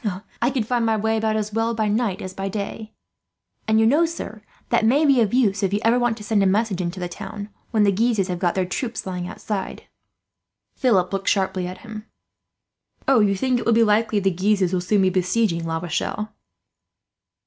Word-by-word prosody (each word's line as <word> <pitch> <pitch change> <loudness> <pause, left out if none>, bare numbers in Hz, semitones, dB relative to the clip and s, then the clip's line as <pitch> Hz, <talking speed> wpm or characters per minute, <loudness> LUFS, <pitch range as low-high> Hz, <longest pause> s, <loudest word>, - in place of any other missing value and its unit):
I 240 - +3
could 255 -5 -1
find 240 +1 0
my 225 -1 +2
way 220 +1 0
about 220 0 0
as 215 -1 -2
well 225 +1 0
by 220 -1 0
night 210 -2 -1
as 185 0 -6
by 195 +1 -4
day; 215 +2 -5 0.8
and 220 0 +3
you 220 - +4
know, 300 +8 +4
sir, 275 -10 -7 0.3
that - - +2
may 275 +8 +4
be 275 -4 +4
of 210 -3 +1
use, 215 -6 +2
if 195 -2 +1
you - - +1
ever 235 +2 +4
want 240 -2 +1
to 210 - -9
send 210 -1 +1
a 195 - +3
message 200 -1 +1
into 175 +1 -4
the 180 - -3
town 205 +3 -7 0.2
when 220 -2 +2
the 200 - +4
Guises 215 -1 +1
have 180 -2 -3
got 175 -1 0
their 190 -1 +1
troops 225 +5 -4
lying 180 -2 -4
outside." 195 +1 -5 0.9
Philip 195 -8 +2
looked 195 0 0
sharply 190 -2 0
at 185 - -8
him. 215 0 -8 1.0
"Oh, 270 -3 +5
you 200 -2 +3
think 250 +5 +1
it - - -5
likely 225 -1 +3
that - - -6
the 190 - +1
Guises 190 -1 +1
will 180 - +1
soon 195 +2 +2
be 185 - +3
besieging 180 -2 0
La 165 0 -1
Rochelle?" 175 +5 -3
210 Hz, 210 wpm, -22 LUFS, 190-225 Hz, 1.0 s, Oh